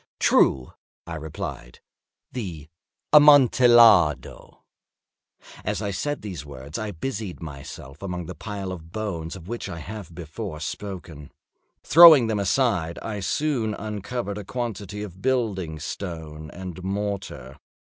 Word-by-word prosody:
"True," 65 -1 +3 0.3
I 85 - -7
replied; 75 -6 -7 0.5
"the 85 - -6 0.4
Amontillado." 120 - +6 1.0
As - - -2
I 100 -1 -2
said 145 +9 -3
these 90 -8 -6
words 70 - -8
I 110 -1 -3
busied 105 0 -5
myself 70 -2 -9
among 90 -3 -4
the 90 - -7
pile 100 -1 -6
of 85 -2 -9
bones 90 -6 -4
of 90 -2 -11
which 120 +2 -5
I 85 - -6
have 90 0 -8
before 85 +1 -6
spoken. 85 -4 -7 0.5
Throwing 160 -5 +9
them 110 -2 -1
aside, 100 -6 +1
I 105 -2 -4
soon 115 0 -1
uncovered 105 0 -4
a - - -6
quantity 105 -3 -5
of 95 -2 -10
building 100 -10 -1
stone 80 -2 -6
and 90 +1 -8
mortar. 95 -9 -4
95 Hz, 125 wpm, -24 LUFS, 80-110 Hz, 1.0 s, Throwing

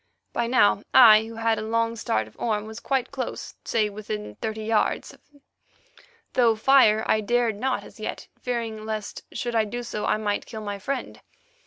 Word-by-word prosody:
By 235 - 0
now 205 -5 +4
I, 220 -4 +9
who 225 0 -9
had 225 0 +1
a - - -4
long 230 +1 0
start 110 - -1
of 110 - -18
Orme, 215 -2 -1
was 220 0 -8
quite 265 -3 -1
close, 265 -2 -5
say 220 -2 +1
within 155 - -6
thirty 220 0 -3
yards, 220 0 0 1.2
though 235 -3 +4
fire 220 -2 +5
I 215 - +2
dared 235 0 +1
not 260 +2 -1
as - - -14
yet, - - -5
fearing 230 -3 -3
lest, 215 -1 -4
should 240 -1 -3
I 220 -1 +3
do 240 +3 -5
so, 210 -3 -4
I - - +2
might 205 -1 -2
kill 220 - -7
my 205 -1 -5
friend. 275 +8 -4
220 Hz, 180 wpm, -25 LUFS, 215-235 Hz, 1.2 s, I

